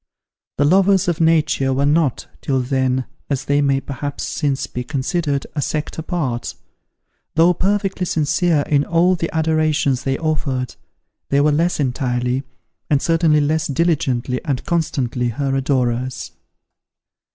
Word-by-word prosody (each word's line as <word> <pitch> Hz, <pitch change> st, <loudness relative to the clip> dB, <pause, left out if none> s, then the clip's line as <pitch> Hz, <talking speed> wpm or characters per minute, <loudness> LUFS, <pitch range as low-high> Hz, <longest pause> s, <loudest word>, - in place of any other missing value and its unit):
The 145 Hz, -, +3 dB
lovers 190 Hz, +3 st, +4 dB
of 170 Hz, -1 st, 0 dB
Nature 155 Hz, -4 st, +2 dB
were 140 Hz, +2 st, +1 dB
not, 145 Hz, -3 st, +1 dB, 0.2 s
till 135 Hz, -2 st, 0 dB
then, 130 Hz, 0 st, 0 dB, 0.2 s
as 140 Hz, -3 st, -2 dB
they 145 Hz, 0 st, +2 dB
may 140 Hz, -1 st, +2 dB
perhaps 140 Hz, +1 st, -5 dB
since 145 Hz, -3 st, -1 dB
be 125 Hz, -, -5 dB
considered, 140 Hz, +1 st, -1 dB
a 150 Hz, -, -2 dB
sect 150 Hz, +2 st, -3 dB
apart. 150 Hz, -8 st, -3 dB, 0.8 s
Though 165 Hz, +3 st, +5 dB
perfectly 195 Hz, 0 st, -1 dB
sincere 160 Hz, +1 st, +1 dB
in 145 Hz, 0 st, +1 dB
all 170 Hz, +4 st, +3 dB
the 165 Hz, -1 st, -3 dB
adorations 155 Hz, -4 st, +1 dB
they 135 Hz, 0 st, 0 dB
offered, 140 Hz, -6 st, -2 dB, 0.5 s
they 140 Hz, -, +3 dB
were 150 Hz, +1 st, +4 dB
less 165 Hz, +4 st, +1 dB
entirely, 125 Hz, -2 st, 0 dB, 0.5 s
and 145 Hz, -3 st, +3 dB
certainly 165 Hz, -1 st, +3 dB
less 155 Hz, +2 st, 0 dB
diligently 135 Hz, -5 st, 0 dB
and 140 Hz, -5 st, -2 dB
constantly, 135 Hz, -8 st, -1 dB
her 135 Hz, +3 st, -1 dB
adorers. 130 Hz, -2 st, -1 dB
145 Hz, 135 wpm, -20 LUFS, 130-165 Hz, 0.8 s, Though